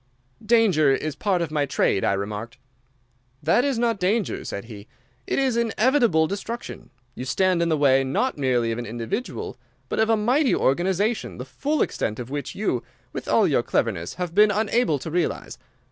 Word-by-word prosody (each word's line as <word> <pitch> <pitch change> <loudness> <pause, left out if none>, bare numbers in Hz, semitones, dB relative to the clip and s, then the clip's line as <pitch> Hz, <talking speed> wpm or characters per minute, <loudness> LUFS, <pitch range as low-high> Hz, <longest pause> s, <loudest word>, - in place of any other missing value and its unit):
"'Danger 215 -10 +4
is 155 +2 -1
part 185 +1 0
of 160 - -5
my 150 -2 +1
trade,' 140 -8 +1
I - - +2
remarked. 105 +5 -4 0.9
"'That 170 +11 +3
is 275 -3 0
not 230 -3 +1
danger,' 205 +3 0
said 100 - -6
he. 105 -2 -11 0.4
'It - - -1
is 265 -3 +1
inevitable 235 - +3
destruction. 205 +6 -6 0.2
You 125 - -6
stand 185 +6 +1
in 170 - +1
the 160 - +2
way 135 -2 +4
not 140 - 0
merely 125 -5 +1
of 115 - -3
an 120 - -5
individual, 115 - -4 0.3
but - - -2
of 220 0 +3
a 225 - +4
mighty 250 +6 +2
organization, 190 - 0
the 125 - -6
full 285 - 0
extent 110 - -3
of 125 +1 -7
which 145 0 -4
you, 190 - -1 0.3
with - - -6
all - - +4
your - - +2
cleverness, 85 +1 -1
have 180 -2 -4
been 210 +3 +6
unable 215 -4 +1
to 155 +4 -7
realize. 165 -7 -2
170 Hz, 180 wpm, -24 LUFS, -, 0.9 s, been